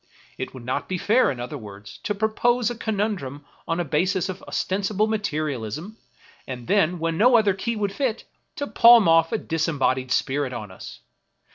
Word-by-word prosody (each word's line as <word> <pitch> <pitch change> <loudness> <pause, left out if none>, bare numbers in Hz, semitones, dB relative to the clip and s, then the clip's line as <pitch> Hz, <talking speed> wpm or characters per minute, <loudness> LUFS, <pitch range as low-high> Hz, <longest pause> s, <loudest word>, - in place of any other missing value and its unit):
It - - -4
would 125 -2 -10
not 130 - -3
be 185 - -1
fair, 225 +8 +3
in 130 - -4
other 125 +4 -5
words, 100 -2 -11
to 205 - -1
propose 230 +3 +1
a - - -5
conundrum 200 - -3 0.2
on 165 +1 -1
a 175 - -1
basis 180 +5 0
of 185 0 -6
ostensible 200 +2 0
materialism, 155 - -3 0.5
and 125 -2 -6
then, 180 - +2
when 165 0 -2
no 245 +2 +6
other 210 -3 +3
key 230 +5 -3
would 205 -2 -2
fit, 235 0 -2 0.3
to 285 - -3
palm 235 -6 +7
off 165 0 +4
a - - +1
disembodied 140 -5 -1
spirit 135 -1 0
on 105 -5 -6
us. 95 - -11
175 Hz, 175 wpm, -24 LUFS, 135-215 Hz, 0.5 s, palm